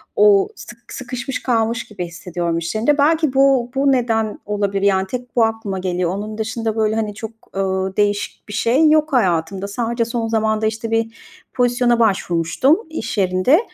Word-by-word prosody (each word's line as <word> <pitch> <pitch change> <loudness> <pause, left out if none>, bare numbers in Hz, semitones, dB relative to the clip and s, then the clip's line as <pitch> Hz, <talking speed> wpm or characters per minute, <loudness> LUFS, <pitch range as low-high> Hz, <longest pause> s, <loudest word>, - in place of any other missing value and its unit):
O 415 -2 +5
sık 235 -6 -12
sıkışmış 255 +1 -5
kalmış 230 -1 0
gibi 185 -4 -5
hissediyorum 170 0 -3
iş 170 +4 -3
yerinde. 240 +7 +2
Belki 310 -1 +2
bu 270 -3 +3
bu 275 +1 +3
neden 225 -4 0
olabilir, 200 -1 -1
yani, 190 -1 +2
tek 245 +3 -6
bu 235 - +4
aklıma 220 -4 -3
geliyor. 180 -1 -1
Onun 215 +2 -5
dışında, 225 0 -2
böyle, 220 -1 +1
hani 215 -2 -2
çok, 220 +1 -6 0.3
ııı, 190 0 -1
değişik 205 0 -1
bir - - -6
şey 265 +9 +3
yok 310 0 +3
hayatımda. 190 -3 +1
Sadece 230 +2 -1
son 230 -1 -2
zamanda, 220 -1 0
işte, 225 +1 -4
bir 225 0 0 0.4
pozisyona 245 -1 +2
başvurmuştum 195 - +2
iş 230 -8 -5
yerinde. 185 - +3
225 Hz, 165 wpm, -19 LUFS, 195-245 Hz, 0.4 s, O